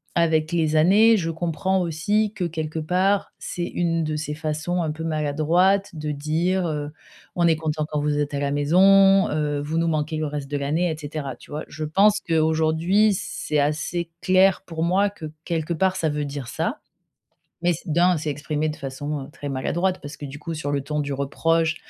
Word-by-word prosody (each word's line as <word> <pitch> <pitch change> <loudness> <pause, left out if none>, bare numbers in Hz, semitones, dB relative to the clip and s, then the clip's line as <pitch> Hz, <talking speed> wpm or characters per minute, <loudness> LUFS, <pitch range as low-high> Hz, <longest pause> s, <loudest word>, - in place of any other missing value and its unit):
avec 160 -1 +2
les 160 -2 +1
années, 205 +8 +6
je 165 -4 -1
comprends 175 +3 -1
aussi 205 +6 0
que, 185 - -3
quelque 160 -1 -4
part, 185 +5 +1
c'est 175 -1 -4
une 165 -1 -1
de 155 0 -2
ses 150 -1 -4
façons, 160 +3 -2
un 155 - -1
peu 160 +2 -6
maladroite 165 +6 +2
de 150 -1 -3
dire, 165 +5 0
heu: 150 -2 -3 0.4
«On 170 -1 +3
est 165 - +4
contents 155 -1 -2
quand 150 - -1
vous 145 0 0
êtes 145 -1 -1
à - - -1
la 140 0 -1
maison, 195 +7 +5
heu, 150 -1 -1
vous 155 +3 -2
nous 165 - +1
manquez 155 0 -1
le 155 0 -1
reste 145 -1 -5
de 145 - 0
l'année» 155 +5 0
et - - -3
cetera, 145 -3 -5
tu - - -18
vois? 150 +1 -4
Je 155 - -6
pense 200 +7 +3
qu'aujourd'hui, 160 +6 +2
c'est 155 -3 -3
assez 160 +4 -1
clair 185 0 +4
pour 165 -2 -3
moi 190 +4 +2
que, 200 -6 -10 0.2
quelque 165 -1 -2
part, 185 +3 +1
ça 160 -4 0
veut 150 0 -2
dire 140 -3 -6
ça, - - -2 0.8
mais 175 0 +2
c'est 165 0 -6
d'un 175 +3 +4
c'est 155 0 -3
exprimé 150 +2 -2
de 150 - -6
façon, 140 +2 -4
heu, - - -13
très 145 -3 -6
maladroite. 175 +8 -1
Parce 145 +1 -8
que, 145 - -8
du 140 +1 -8
coup, 165 +2 -5
sur 150 -2 -3
le 145 - +1
ton 150 +2 -2
du 145 -1 -4
reproche, 160 +4 +1
160 Hz, 205 wpm, -23 LUFS, 150-175 Hz, 0.8 s, années